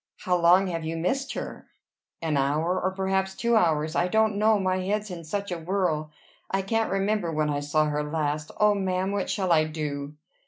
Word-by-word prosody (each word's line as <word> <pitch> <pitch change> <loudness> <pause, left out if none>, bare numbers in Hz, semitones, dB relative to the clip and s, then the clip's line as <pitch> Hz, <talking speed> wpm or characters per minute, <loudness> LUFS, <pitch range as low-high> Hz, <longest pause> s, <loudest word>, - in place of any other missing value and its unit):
"How 180 - +1
long 175 +2 +5
have 165 -3 -3
you 160 +1 -3
missed 265 +12 -1
her?" - - -6 0.6
"An 160 -2 0
hour. 155 +6 +1
Or 185 - +1
perhaps 190 0 -1
two 235 0 +1
hours. 160 -5 +2
I 175 - +2
don't 220 +2 +2
know, 215 +1 +4
my 185 -1 0
head's 205 +2 -2
in 170 -2 -7
such 200 +4 -4
a 175 - -3
whirl. 165 -3 -1 0.4
I 195 0 0
can't 225 +3 0
remember 195 -2 0
when 155 -1 0
I 145 - -1
saw 145 +2 +1
her 150 0 -1
last. 150 0 -2
O 210 0 +5
ma'am! 190 -1 -1
What 200 -1 -2
shall 190 -3 0
I 155 -2 +5
do?" 150 -2 -4
180 Hz, 200 wpm, -26 LUFS, 155-195 Hz, 0.6 s, long